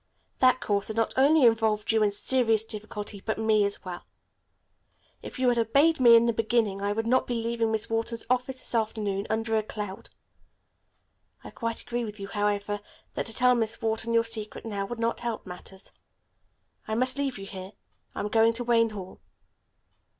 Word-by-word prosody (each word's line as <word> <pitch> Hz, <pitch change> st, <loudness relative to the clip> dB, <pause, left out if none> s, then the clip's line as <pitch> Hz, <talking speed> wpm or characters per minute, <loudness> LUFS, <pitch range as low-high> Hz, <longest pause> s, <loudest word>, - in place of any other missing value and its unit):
That 255 Hz, -1 st, +4 dB
course 200 Hz, -2 st, 0 dB
has 220 Hz, -, -4 dB
not 225 Hz, -1 st, 0 dB
only 280 Hz, +1 st, +5 dB
involved 220 Hz, -2 st, +2 dB
you 220 Hz, -1 st, +2 dB
in 210 Hz, -, +4 dB
serious 225 Hz, +1 st, +2 dB
difficulty, 210 Hz, -2 st, -5 dB
but 220 Hz, -, -2 dB
me 220 Hz, -1 st, +3 dB
as 200 Hz, 0 st, -5 dB
well. 180 Hz, -1 st, -6 dB, 1.2 s
If -, -, -9 dB
you 255 Hz, 0 st, +1 dB
had 240 Hz, -1 st, +2 dB
obeyed 280 Hz, +8 st, +3 dB
me 240 Hz, -2 st, +8 dB
in 230 Hz, 0 st, +6 dB
the 235 Hz, -, +2 dB
beginning, 220 Hz, -3 st, 0 dB
I 200 Hz, 0 st, 0 dB
would 225 Hz, +2 st, -1 dB
not 255 Hz, +2 st, +2 dB
be 245 Hz, -, -2 dB
leaving 230 Hz, -1 st, -1 dB
Miss 220 Hz, -1 st, -1 dB
Wharton's 225 Hz, +1 st, -2 dB
office 255 Hz, +1 st, 0 dB
this -, -, -5 dB
afternoon, 215 Hz, -3 st, -1 dB
under 225 Hz, 0 st, 0 dB
a 220 Hz, -, +3 dB
cloud. 210 Hz, 0 st, -7 dB, 1.3 s
I -, -, -9 dB
quite 230 Hz, -1 st, -4 dB
agree 240 Hz, 0 st, -3 dB
with 210 Hz, -2 st, -7 dB
you, 195 Hz, 0 st, -6 dB
however, 205 Hz, 0 st, -1 dB, 0.3 s
that -, -, -3 dB
to 225 Hz, -, -6 dB
tell 250 Hz, 0 st, +4 dB
Miss 230 Hz, -1 st, -1 dB
Wharton 225 Hz, 0 st, -1 dB
your 230 Hz, 0 st, +4 dB
secret 225 Hz, -1 st, -5 dB
now 200 Hz, -3 st, -3 dB
would 240 Hz, +1 st, -6 dB
not 230 Hz, 0 st, -1 dB
help 235 Hz, -2 st, -4 dB
matters. 190 Hz, +1 st, -10 dB, 1.0 s
I 220 Hz, -, -1 dB
must 255 Hz, +3 st, +2 dB
leave 275 Hz, -4 st, -1 dB
you 195 Hz, -, -8 dB
here. 190 Hz, 0 st, -8 dB, 0.4 s
I -, -, -3 dB
am 210 Hz, -, -3 dB
going 225 Hz, +1 st, +4 dB
on 230 Hz, -, +2 dB
to 245 Hz, -, -3 dB
Wayne 230 Hz, -1 st, +3 dB
Hall." 195 Hz, -3 st, -9 dB
225 Hz, 195 wpm, -27 LUFS, 210-235 Hz, 1.3 s, me